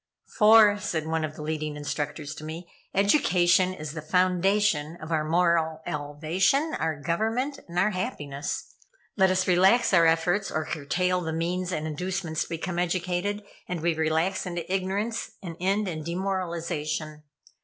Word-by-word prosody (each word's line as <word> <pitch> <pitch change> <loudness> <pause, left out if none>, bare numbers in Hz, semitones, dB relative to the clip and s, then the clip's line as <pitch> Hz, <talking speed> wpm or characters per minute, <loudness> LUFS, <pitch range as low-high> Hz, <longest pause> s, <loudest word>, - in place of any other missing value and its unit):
"For," 210 -2 +7
said 160 -5 -2
one 160 0 -1
of 155 0 -4
the 155 - -7
leading 155 -1 -3
instructors 145 0 -4
to - - -10
me, 160 +3 -7 0.2
"education 185 -4 +3
is 155 -5 -6
the 155 0 -6
foundation 180 -1 +1
of 155 +1 -8
our 155 -1 +1
moral 165 -1 +1
elevation, 160 - 0
our 160 -2 -1
government, 225 - -1
our 180 +5 +1
happiness. 150 - -4 0.4
Let 190 -2 +4
us 185 0 +1
relax 190 +6 +4
our 170 -2 +6
efforts, 175 +5 +1
or 155 0 -2
curtail 180 +4 -1
the 160 -2 -3
means 180 +3 -2
and 155 -3 -2
inducements 170 +1 -3
to - - -3
become 170 +1 -3
educated, 180 +3 -1 0.2
and 180 -3 -3
we 170 +1 +2
relax 160 +5 0
into 175 0 -4
ignorance, 195 +4 -2
and 170 -3 -6
end 195 +3 +1
in 155 -3 -4
demoralization. 170 -4 -3
175 Hz, 150 wpm, -26 LUFS, 155-190 Hz, 0.4 s, For